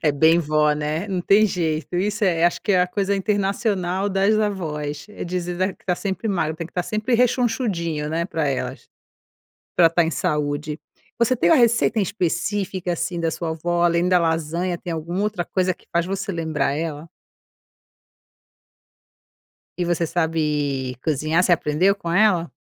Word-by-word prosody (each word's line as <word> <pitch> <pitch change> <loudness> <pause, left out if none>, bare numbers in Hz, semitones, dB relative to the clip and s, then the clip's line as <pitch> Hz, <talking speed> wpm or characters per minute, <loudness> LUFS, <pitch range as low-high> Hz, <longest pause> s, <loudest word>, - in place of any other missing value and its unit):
É 150 -2 +3
bem 160 +4 +4
vó, 150 -2 +2
né, 150 +5 -2
não 185 -2 -1
tem 205 +4 +4
jeito, 165 -2 -2
isso 205 +3 0
é, 170 -3 +2
acho 175 - +2
que 205 - +1
é 180 - +4
a - - +1
coisa 200 +1 -1
internacional 195 -1 0
das 195 +2 +2
avós, 155 -8 -3
é 210 - -7
dizer 175 0 -3 0.2
que - - -29
está 180 - 0
sempre 195 +4 -3
magro, 160 -5 -1
tem 170 - -5
que - - -20
estar 180 - -2
sempre 215 +5 -1
rechonchudinho, 225 - 0
né 165 +2 -1
pra 160 -5 -2
elas, 135 - -4 0.9
pra 165 -2 +6
tá 170 +1 +2
em 165 - -1
saúde. 150 +1 -2 0.4
Você 245 +2 +3
tem 170 -7 +2
uma - - +7
receita 230 -2 +3
em - - +3
específica, 185 0 -1
assim, 175 +1 -2
da 165 -1 0
sua 165 0 -4
avó, 175 +2 -1
além 170 +1 +2
da 180 - +5
lasanha 165 +2 -1
tem 175 - -6
alguma 165 +4 -3
outra 210 -5 -1
coisa 185 -1 0
que - - -26
faz 170 0 +1
você 195 +1 -3
lembrar 160 -4 -1
ela? 155 0 -4 2.7
E 175 - 0
você 170 -1 0
sabe 150 -6 -1
cozinhar, 155 +3 +1
você 180 - +2
aprendeu 170 +5 +2
com 170 -4 -5
ela? 180 -3 +3
175 Hz, 170 wpm, -22 LUFS, 160-195 Hz, 2.7 s, uma